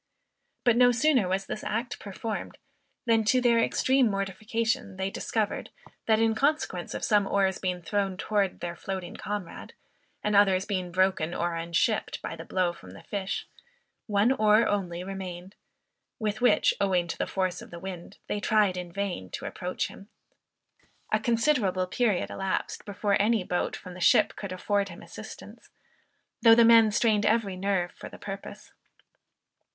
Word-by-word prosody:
But 240 Hz, -1 st, +4 dB
no 245 Hz, 0 st, +6 dB
sooner 250 Hz, -4 st, +3 dB
was 190 Hz, +1 st, -1 dB
this 215 Hz, -, -5 dB
act 230 Hz, +3 st, -3 dB
performed, 210 Hz, +2 st, -5 dB, 0.5 s
than 225 Hz, -2 st, +3 dB
to 255 Hz, +4 st, +4 dB
their 240 Hz, -2 st, +4 dB
extreme 260 Hz, +2 st, +3 dB
mortification 200 Hz, +1 st, -2 dB
they 190 Hz, +1 st, -2 dB
discovered, 215 Hz, 0 st, -2 dB, 0.4 s
that 220 Hz, -1 st, +5 dB
in 225 Hz, 0 st, +3 dB
consequence 245 Hz, -, -1 dB
of -, -, -5 dB
some 205 Hz, -2 st, +3 dB
oars 195 Hz, -2 st, +1 dB
being 180 Hz, -2 st, -2 dB
thrown 195 Hz, +1 st, -1 dB
towards 200 Hz, -2 st, -1 dB
their 175 Hz, 0 st, -4 dB
floating 190 Hz, -1 st, -5 dB
comrade, 205 Hz, -4 st, -6 dB, 0.5 s
and 210 Hz, 0 st, +1 dB
others 195 Hz, -2 st, +4 dB
being 185 Hz, -4 st, -3 dB
broken 185 Hz, -2 st, +1 dB
or 170 Hz, 0 st, -1 dB
unshipped 170 Hz, +6 st, 0 dB
by -, -, -4 dB
the 165 Hz, -, -8 dB
blow 180 Hz, -1 st, 0 dB
from 90 Hz, -, -13 dB
the 95 Hz, -, -13 dB
fish, 195 Hz, -2 st, -3 dB, 0.6 s
one 210 Hz, +3 st, +3 dB
oar 215 Hz, -2 st, +4 dB
only 180 Hz, -4 st, -2 dB
remained; 185 Hz, -1 st, -7 dB, 0.6 s
with 215 Hz, 0 st, -2 dB
which, 245 Hz, -3 st, +4 dB
owing 185 Hz, -3 st, +2 dB
to -, -, -4 dB
the -, -, 0 dB
force 185 Hz, -2 st, -2 dB
of -, -, -11 dB
the 170 Hz, -, -9 dB
wind, 185 Hz, +1 st, -8 dB
they 205 Hz, -, -2 dB
tried 210 Hz, -3 st, +2 dB
in 180 Hz, -1 st, -6 dB
vain 180 Hz, -, -3 dB
to -, -, -6 dB
approach 180 Hz, 0 st, -3 dB
him. 200 Hz, -, -13 dB, 1.0 s
A -, -, +4 dB
considerable 230 Hz, -7 st, +1 dB
period 205 Hz, 0 st, 0 dB
elapsed, 195 Hz, -1 st, -3 dB
before 205 Hz, -1 st, 0 dB
any 220 Hz, -1 st, +2 dB
boat 180 Hz, 0 st, -1 dB
from 185 Hz, -2 st, -10 dB
the 180 Hz, -, -10 dB
ship -, -, +4 dB
could 200 Hz, -2 st, -6 dB
afford 200 Hz, +2 st, 0 dB
him 170 Hz, -, -11 dB
assistance, -, -, -11 dB, 0.7 s
though 225 Hz, -1 st, +8 dB
the 230 Hz, 0 st, +6 dB
men 225 Hz, -1 st, +7 dB
strained 210 Hz, 0 st, +2 dB
every 215 Hz, -4 st, +1 dB
nerve 185 Hz, -2 st, 0 dB
for -, -, -10 dB
the -, -, -12 dB
purpose. 195 Hz, 0 st, -8 dB
200 Hz, 165 wpm, -28 LUFS, 185-220 Hz, 1.0 s, though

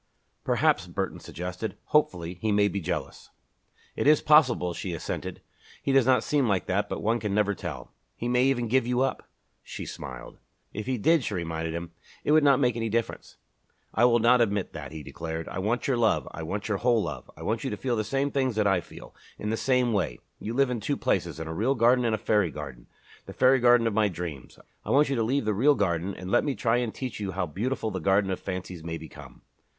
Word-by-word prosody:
"Perhaps," -, -, +2 dB
Burton -, -, -3 dB
suggested, 90 Hz, +5 st, -6 dB
hopefully, 90 Hz, -, +1 dB
"he 110 Hz, -, +1 dB
may 100 Hz, 0 st, +4 dB
be 100 Hz, -1 st, -3 dB
jealous." -, -, -4 dB, 0.7 s
"It -, -, 0 dB
is 150 Hz, 0 st, +6 dB
possible," 130 Hz, -, +4 dB
she 90 Hz, +1 st, -4 dB
assented. -, -, -5 dB, 0.4 s
"He -, -, +1 dB
does 135 Hz, -2 st, +4 dB
not 125 Hz, -3 st, +4 dB
seem 145 Hz, -4 st, +1 dB
like 100 Hz, -3 st, +1 dB
that 100 Hz, +2 st, 0 dB
but -, -, -4 dB
one 115 Hz, +3 st, +1 dB
can 105 Hz, -2 st, -2 dB
never 105 Hz, -1 st, +2 dB
tell." -, -, -7 dB, 0.2 s
"He 120 Hz, -, -4 dB
may 125 Hz, +1 st, +3 dB
even 125 Hz, -3 st, +1 dB
give 120 Hz, +1 st, +2 dB
you 125 Hz, +1 st, +1 dB
up!" 135 Hz, -, -2 dB, 0.3 s
She -, -, -7 dB
smiled. -, -, -8 dB, 0.3 s
"If 105 Hz, +3 st, -5 dB
he 130 Hz, -1 st, 0 dB
did," 160 Hz, +7 st, +3 dB
she 105 Hz, -, -3 dB
reminded 80 Hz, -1 st, -3 dB
him, 85 Hz, 0 st, -5 dB, 0.3 s
"it -, -, +1 dB
would 155 Hz, 0 st, +5 dB
not 140 Hz, -3 st, +5 dB
make 125 Hz, -4 st, +2 dB
any 115 Hz, -1 st, -2 dB
difference." 115 Hz, +1 st, -3 dB, 0.6 s
"I 120 Hz, -, +4 dB
will 120 Hz, -1 st, +5 dB
not 120 Hz, +2 st, +4 dB
admit 100 Hz, -4 st, 0 dB
that," -, -, -7 dB
he 80 Hz, -1 st, -7 dB
declared. 80 Hz, +3 st, -6 dB
"I 90 Hz, -, -5 dB
want 110 Hz, +6 st, -1 dB
your 130 Hz, -3 st, +1 dB
love 105 Hz, -, +2 dB
I 80 Hz, -, -7 dB
want 100 Hz, +6 st, -4 dB
your 105 Hz, -3 st, 0 dB
whole 120 Hz, -3 st, +3 dB
love. 75 Hz, -6 st, -6 dB
I -, -, -9 dB
want -, -, -1 dB
you -, -, -1 dB
to 105 Hz, -, -4 dB
feel 125 Hz, +1 st, -1 dB
the 110 Hz, -, 0 dB
same 135 Hz, +6 st, -1 dB
things 130 Hz, -4 st, 0 dB
that 105 Hz, -1 st, +1 dB
I 95 Hz, -3 st, +3 dB
feel, -, -, -13 dB, 0.2 s
in 105 Hz, -, -3 dB
the -, -, +1 dB
same 125 Hz, -1 st, +1 dB
way. 85 Hz, -, -1 dB, 0.2 s
You 115 Hz, +2 st, -5 dB
live 135 Hz, -1 st, +3 dB
in 120 Hz, -, -2 dB
two -, -, -2 dB
places -, -, -1 dB
in 80 Hz, -, -5 dB
a 80 Hz, -, -4 dB
real 115 Hz, +11 st, +1 dB
garden 120 Hz, +1 st, +4 dB
and 115 Hz, -2 st, +2 dB
a -, -, -4 dB
fairy 105 Hz, -4 st, +1 dB
garden, 70 Hz, -5 st, -8 dB, 0.4 s
the -, -, -8 dB
fairy 130 Hz, +1 st, +4 dB
garden 120 Hz, -1 st, +5 dB
of 115 Hz, -, +1 dB
my 110 Hz, 0 st, +3 dB
dreams. 85 Hz, -7 st, -7 dB, 0.3 s
I -, -, -8 dB
want 145 Hz, +1 st, +4 dB
you 140 Hz, -, 0 dB
to 115 Hz, -, 0 dB
leave 125 Hz, +3 st, 0 dB
the 105 Hz, -, +1 dB
real 140 Hz, +9 st, +4 dB
garden 95 Hz, -2 st, -1 dB
and 90 Hz, +1 st, -7 dB
let -, -, +4 dB
me 140 Hz, -3 st, -1 dB
try 115 Hz, 0 st, +1 dB
and 120 Hz, -2 st, -1 dB
teach 130 Hz, -2 st, -6 dB
you 100 Hz, -2 st, -3 dB
how 90 Hz, 0 st, -1 dB
beautiful 110 Hz, -, -2 dB
the 95 Hz, -, -3 dB
garden 95 Hz, +3 st, +2 dB
of 95 Hz, -, -2 dB
fancies 90 Hz, -3 st, -6 dB
may 80 Hz, 0 st, -4 dB
become." 80 Hz, -1 st, -12 dB
110 Hz, 235 wpm, -27 LUFS, 90-125 Hz, 0.7 s, is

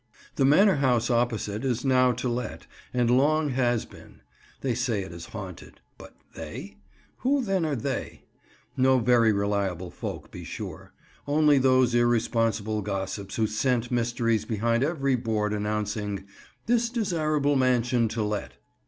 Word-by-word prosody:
The 135 Hz, -, +2 dB
manor 185 Hz, +6 st, +5 dB
house 125 Hz, -3 st, +2 dB
opposite 115 Hz, -2 st, 0 dB
is 125 Hz, -1 st, -1 dB
now 130 Hz, -1 st, +4 dB
to 125 Hz, +2 st, -3 dB
let, 120 Hz, -2 st, -4 dB, 0.3 s
and 120 Hz, -1 st, +2 dB
long 150 Hz, +3 st, +3 dB
has 120 Hz, -3 st, +1 dB
been. -, -, -16 dB, 0.4 s
They 130 Hz, -3 st, 0 dB
say 115 Hz, -4 st, -1 dB
it 95 Hz, -, -9 dB
is 85 Hz, 0 st, -9 dB
haunted—but 95 Hz, -5 st, -11 dB, 0.2 s
"they"? -, -, -8 dB, 0.4 s
Who 275 Hz, +1 st, +1 dB
then 195 Hz, -6 st, 0 dB
are 150 Hz, -, -1 dB
they? 130 Hz, +2 st, -4 dB, 0.5 s
No 130 Hz, 0 st, +4 dB
very 120 Hz, -2 st, +4 dB
reliable 100 Hz, -3 st, -1 dB
folk, -, -, -7 dB
be -, -, -8 dB
sure: -, -, -7 dB, 0.4 s
only 150 Hz, -1 st, +4 dB
those 130 Hz, -2 st, +3 dB
irresponsible 115 Hz, -2 st, +1 dB
gossips 100 Hz, 0 st, -4 dB
who 110 Hz, -, +1 dB
scent 120 Hz, +3 st, 0 dB
mysteries 115 Hz, -2 st, 0 dB
behind 115 Hz, +3 st, 0 dB
every 140 Hz, -3 st, 0 dB
board 110 Hz, -3 st, -1 dB
announcing 105 Hz, -1 st, -2 dB, 0.4 s
"This 235 Hz, 0 st, +2 dB
Desirable 155 Hz, -, 0 dB
Mansion 125 Hz, -2 st, +2 dB
to 110 Hz, 0 st, -2 dB
Let." 105 Hz, -1 st, -3 dB
120 Hz, 140 wpm, -26 LUFS, 110-135 Hz, 0.5 s, manor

